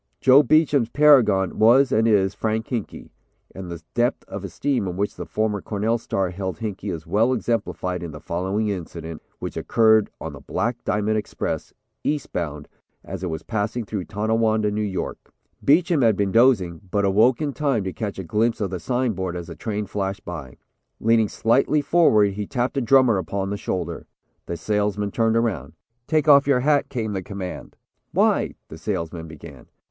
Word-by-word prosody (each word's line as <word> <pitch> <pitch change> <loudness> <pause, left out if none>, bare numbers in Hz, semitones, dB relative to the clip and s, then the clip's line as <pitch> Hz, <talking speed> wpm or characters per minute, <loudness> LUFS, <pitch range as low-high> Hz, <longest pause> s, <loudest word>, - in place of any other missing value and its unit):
Joe 135 +2 +7
Beacham's 145 -4 +3
paragon 120 -11 +4
was 125 +5 +5
and 110 +1 +3
is 100 -3 +3
Frank 110 0 -2
Hinkey 120 -6 -5 0.4
and 95 -2 -8
the 85 -2 -7
depth 120 +2 0
of 100 - -7
esteem 100 - -1
in 90 0 -4
which 100 +1 -1
the - - -7
former 105 -2 -1
Cornell 110 +4 -1
star 95 -5 -2
held 95 0 -4
Hinkey 105 -3 -5
is 80 -2 -6
well 115 +5 +2
exemplified 100 -7 -2
in 85 - -5
the 75 -1 -9
following 95 +7 -2
incident, 85 -4 -6 0.2
which - - -6
occurred 110 -2 +3
on - - -6
the - - -10
Black 120 +1 -3
Diamond 105 +1 +1
Express, 105 - -4 0.3
Eastbound, 85 - -3 0.4
as 95 0 -7
it 90 - -3
was 80 -1 -5
passing 110 +2 -2
through 100 -3 -4
Tonawanda, 110 0 +1
New 105 +1 -2
York. 100 -3 -4 0.3
Beacham 165 +1 +3
had 115 -4 +4
been 100 -1 0
dozing, 110 -8 +3
but 100 +1 +1
awoke 110 +6 +4
in 150 -2 -2
time 135 -8 0
to 95 -1 -4
catch 105 -3 -4
a 95 - -4
glimpse 110 +6 0
of 100 -4 -2
the 90 - -3
signboard 95 -4 -1
as 85 -1 -5
the - - -9
train 105 -2 -3
flashed 100 0 -4
by. 80 -7 -7 0.4
Leaning 115 -1 +3
slightly 135 +6 +2
forward 125 -11 +4
he 105 0 -4
tapped 125 +1 -1
a 135 - +1
drummer 120 -3 +4
upon 95 +3 -3
the - - -1
shoulder. 85 -4 -4 0.4
The 85 - -4
salesman 105 +2 -1
turned 115 +1 +2
around. 95 - -1 0.3
"Take 155 -1 +1
off 140 -1 +7
your 130 -3 +3
hat," 145 +1 +2
came 110 -5 -3
the 95 - -2
command. 95 -1 -7 0.4
"Why?" - - +2
the - - -11
salesman 80 0 -4
began. 80 -2 -12
105 Hz, 180 wpm, -23 LUFS, 95-120 Hz, 0.4 s, Joe